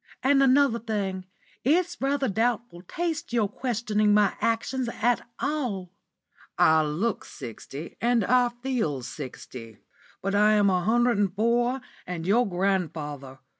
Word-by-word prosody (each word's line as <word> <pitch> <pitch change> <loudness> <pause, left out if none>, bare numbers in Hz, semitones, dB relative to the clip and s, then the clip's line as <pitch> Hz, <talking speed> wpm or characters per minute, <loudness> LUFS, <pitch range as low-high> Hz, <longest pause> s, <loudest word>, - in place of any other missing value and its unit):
And 275 +1 +4
another 270 -2 +4
thing: 200 -5 -3 0.4
it's 345 +6 +1
rather 275 0 +1
doubtful 225 -3 -1
taste 330 - -3
your 225 -4 +2
questioning 215 -2 0
my 205 -2 +3
actions 235 +2 0
at 235 +1 0
all. 245 - -2 0.7
I 160 0 +5
look 165 +9 -1
sixty 140 +3 -9
and 235 -3 +2
I 250 +2 +4
feel 240 - -2
sixty, 120 -5 -8 0.5
but 195 +1 -1
I 210 +1 +5
am 205 -2 +4
a 180 -1 +1
hundred 240 +1 +2
and 195 -2 0
four 240 +4 +1 0.3
and 175 -2 -4
your 220 +4 +3
grandfather. 160 -8 -2
215 Hz, 130 wpm, -26 LUFS, 180-245 Hz, 0.7 s, I